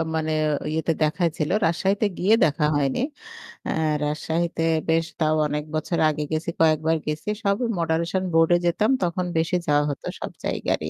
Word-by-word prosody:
মানে 160 0 -1 0.4
ইয়েতে 160 +1 0
দেখাইছিল। 155 -1 0 0.2
রাজশাহীতে 195 +6 +1
গিয়ে 195 +5 +3
দেখা 150 0 +1
হয়নি। 140 - 0 0.7
অ্যা - - -1 0.3
রাজশাহীতে 165 +2 -1 0.3
বেশ 165 0 +3
তাও 155 0 +2
অনেক 150 0 -2
বছর 160 +2 -1
আগে 150 0 -2
গেছি 155 +2 -1
কয়েকবার 160 0 +3
গেছি। 150 +6 -3
সব 200 -1 +2 0.2
মডারেশন 165 +3 0
বোর্ড 165 +1 +4
এ - - +4
যেতাম 180 +5 +2
তখন 180 +1 -1
বেশি 165 +3 +1
যাওয়া 145 0 +3
হত 140 - -5 0.2
সব - - -5
জায়গারই। 80 - -1
160 Hz, 155 wpm, -24 LUFS, 155-170 Hz, 0.7 s, বোর্ড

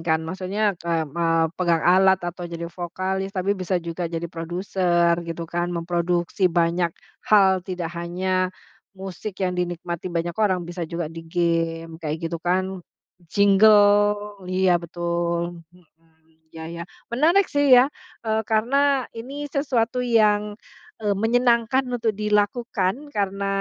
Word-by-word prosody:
kan. 160 -1 0
Maksudnya, 190 +5 -1
kay 165 -1 -1
m 145 - -13
eee, 165 0 +2
ke - - -68
pegang 170 -2 +2
alat, 190 +1 +5
atau 175 0 -5
jadi 170 0 -6
vokalis, 185 +3 -3
tapi 190 +2 +1
bisa 185 -2 -1
juga 170 0 -4
jadi 165 0 -4
produser 175 0 +1 0.2
gitu 165 0 -4
kan. 175 +1 -2
Memproduksi 175 +2 0
banyak 170 0 +1 0.4
hal, 190 -3 +5
tidak 175 -2 -4
hanya, 185 +2 -1 0.5
musik 190 +1 -7
yang 180 - 0
dinikmati 175 -1 -3
banyak 170 0 -2
orang, 185 -4 +2
bisa 175 -1 -5
juga 170 0 -3
di 165 - -7
game 165 -1 -1
kayak 155 -2 -2
gitu 165 0 -3
kan, 185 +2 -1 0.5
jingle, 205 +1 +4
iya 185 -2 +3
betul 170 0 -2
hmm, 160 -2 -29
ya 160 0 -8
ya, 170 +1 -6 0.2
menarik 330 +11 +3
sih 285 -1 +1
ya, 250 0 +8 0.4
eee, 220 0 +1
karena 270 +4 +2
ini 275 +6 -6
sesuatu 255 -4 0
yang, 210 -3 +2 0.4
eee, 205 -2 0
menyenangkan 235 +4 +2
untuk 240 -2 0
dilakukan 210 -1 0 0.2
karena, 200 -1 -1
180 Hz, 135 wpm, -23 LUFS, 170-210 Hz, 0.5 s, ya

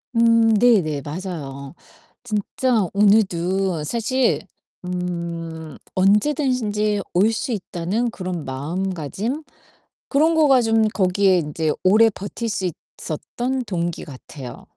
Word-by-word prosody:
음. 230 -1 +5
네네. 200 -11 +3
맞아요. 145 -4 -6 0.5
진짜 220 -1 0
오늘도 190 -4 +2
사실 235 - 0 0.4
음 170 -3 -5 0.2
언제든지 210 0 +2
올 200 +6 +4
수 255 +4 -3
있다는 205 +3 -2
그런 180 -6 -5
마음가짐? 185 - -3 0.7
그런 315 +4 +3
거가 285 -5 +5
좀 225 -1 +3
거기에 190 -2 +2
인제 155 -1 -1
오래 220 +4 +6
버틸 205 +3 -5
수 195 -3 -1 0.3
있었던 250 - -3
동기 175 -5 -3
같아요. 130 -1 -10
195 Hz, 210 characters per minute, -22 LUFS, 170-230 Hz, 0.7 s, 오래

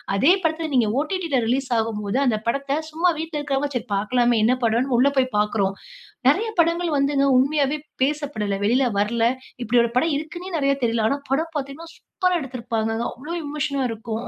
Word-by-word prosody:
அதே 270 - +5
படத்துல 320 0 -1
நீங்க 235 -4 +3
ஓடிடி 355 +2 -3
ல 255 - +3
ரிலீஸ் 260 +3 0
ஆகும்போது 215 +1 -2
அந்த 225 -5 +1
படத்த 275 +4 0
சும்மா 340 +3 +2
வீட்ல 320 -1 -4
இருக்றவங்க 285 0 -1
சரி 245 0 -3
பார்க்கலாமே, 240 +3 +2
என்ன 250 +3 +4
படம்ன்னு 240 +3 +1
உள்ளே 280 +2 +4
போய் 255 -2 0
பார்க்றோம். 210 -2 0 0.5
நெறைய 420 +11 +2
படங்கள் 335 -1 0
வந்துங்க 275 0 +2
உண்மையாவே 285 +2 +1 0.2
பேசப்படல்ல. 275 -9 -1
வெளியில 250 +5 +3
வரல. 230 +3 0 0.4
இப்படி 240 +2 +3
ஒரு 235 - -4
படம் 315 +3 +2
இருக்குன்னே 345 +4 -6
நெறைய 275 -2 +2
தெரியல. 230 -1 +1
ஆனா 280 - 0
படம் 320 +4 0
பார்த்தீங்கன்னா, 290 +4 -6
சூப்பரா 365 -2 -1
எடுத்திருப்பாங்கங்க. 230 -3 -3
அவ்வளவு 330 +7 -5
எமோஷனா 285 -2 -2
இருக்கும். 225 +1 -5
270 Hz, 170 wpm, -23 LUFS, 230-305 Hz, 0.5 s, அதே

